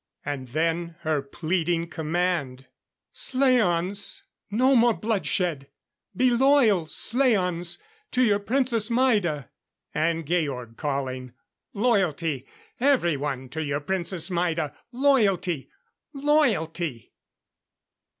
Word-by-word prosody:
And 140 -3 -4
then 165 +5 -1
her 155 -2 0
pleading 170 +3 -1
command: 160 -5 -2 0.5
"Slaans, 205 -8 +1 0.3
no 255 +6 +3
more 235 -1 +4
bloodshed! 180 -9 -1 0.5
Be 255 0 +4
loyal, 240 - +4
slaans, 185 - +1 0.3
to 255 - +2
your 205 -4 +3
Princess 235 0 +1
Maida!" 210 - +1 0.4
And 165 +1 0
Georg 140 -8 -2
calling: 130 -3 -3 0.4
"Loyalty, 175 - 0 0.3
everyone, 150 - +1
to 160 +4 -4
your 140 -1 -1
Princess 180 +2 -2
Maida. 165 -4 -1 0.2
Loyalty! 210 - +1 0.4
Loyalty!" 195 - 0
175 Hz, 90 wpm, -25 LUFS, 150-230 Hz, 0.5 s, more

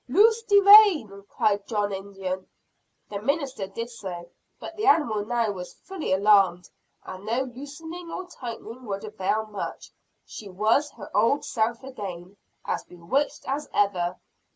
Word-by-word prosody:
"Loose 445 - +5
de 410 -3 +5
rein!" 385 - +7
cried 205 -1 0
John 205 -3 -1
Indian. 190 -1 -5 0.6
The 200 -1 -4
minister 270 -5 -1
did 230 +5 -6
so. 175 -6 -8 0.3
But - - -8
the 420 -1 -2
animal 235 - +3
now 230 0 0
was 180 -2 -8
fully 380 - -6
alarmed; 190 -2 +4 0.4
and 185 +1 -8
no 230 +5 0
loosening 295 +7 -9
or 370 - -5
tightening 245 -4 -8
would 200 -2 -4
avail 215 0 -1
much. 210 -2 -7 0.3
She 205 - -9
was 220 +10 +2
her - - -11
old 230 +7 +3
self 230 +1 -1
again 195 -8 -8 0.3
as - - -2
bewitched 180 +12 -2
as 285 +2 -3
ever. 185 -4 +1
220 Hz, 145 wpm, -26 LUFS, 195-280 Hz, 0.6 s, rein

